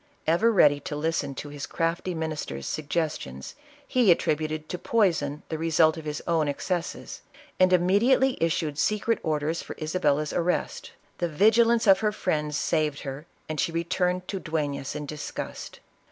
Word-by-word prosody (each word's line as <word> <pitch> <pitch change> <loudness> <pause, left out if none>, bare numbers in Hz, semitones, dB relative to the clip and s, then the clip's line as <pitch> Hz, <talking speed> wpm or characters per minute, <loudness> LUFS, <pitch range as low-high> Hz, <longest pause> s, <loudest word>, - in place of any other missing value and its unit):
Ever 175 +9 +3
ready 145 -8 +5
to 150 - -6
listen 150 -2 -1
to 145 - -6
his 145 -1 -6
crafty 170 +2 -2
minister's 155 - -4
sug 155 -2 -4
gestions, 150 - -3 0.3
he 250 -6 +3
attributed 155 -2 +1
to 180 - -4
poison 165 -9 +1
the 160 - -3
result 160 -1 +3
of 160 - -8
his 150 -1 -4
.own 165 -3 +1
excesses, 175 +4 -3 0.4
and 185 0 +5
immediately 210 +9 +4
issued 160 -3 0
secret 215 +2 +1
orders 155 +1 -1
for - - -8
Isabella's 155 -2 0
arrest. 175 +1 -1 0.3
The 175 - 0
vigilance 225 +7 +4
of 195 -2 +6
her 215 -1 +1
friends 150 -7 -1
saved 150 -2 0
her, 140 +3 -7 0.2
and 155 -1 -4
she 165 - +1
returned 180 +2 -1
to 195 - -2
Dueiias 145 -5 -3
in 150 0 -4
disgust. 150 +1 -6
160 Hz, 155 wpm, -26 LUFS, 150-180 Hz, 0.4 s, of